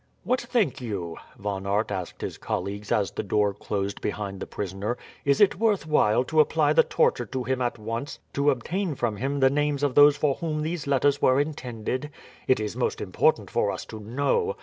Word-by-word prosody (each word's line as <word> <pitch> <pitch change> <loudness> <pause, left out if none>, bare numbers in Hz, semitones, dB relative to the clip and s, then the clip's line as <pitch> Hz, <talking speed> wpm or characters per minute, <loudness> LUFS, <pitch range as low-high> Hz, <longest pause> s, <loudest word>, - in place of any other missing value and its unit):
"What 255 - +1
think 205 - 0
you?" 95 -8 -4 0.2
Von 100 -1 -4
Aert 105 +3 0
asked 90 -2 -5
his - - -5
colleagues 100 +1 -4
as 105 -6 +2
the - - -3
door 105 0 +1
closed 100 0 -3
behind 100 -2 -3
the - - -5
prisoner. 100 +4 -3 0.3
"Is 140 -1 +3
it 195 -3 +4
worth 215 -6 +2
while 125 -7 +3
to 155 +5 0
apply 155 - +4
the 485 - +7
torture 470 0 +1
to 130 -1 -3
him 130 0 -1
at 120 -1 -1
once 115 +5 -4 0.2
to 140 +1 +2
obtain 160 - -1
from 115 -5 -1
him 140 +4 -2
the 135 0 +5
names 145 0 0
of 140 -3 +2
those 145 +1 +7
for 145 -1 +2
whom 155 0 -3
these 160 -2 -3
letters 140 +1 +2
were 130 +1 +4
intended? 130 -2 -3 0.4
It 130 - +4
is 105 -1 -3
most - - -1
important - - +1
for - - +1
us - - -6
to 110 - -6
know. 140 - 0
130 Hz, 200 wpm, -26 LUFS, 105-150 Hz, 0.4 s, the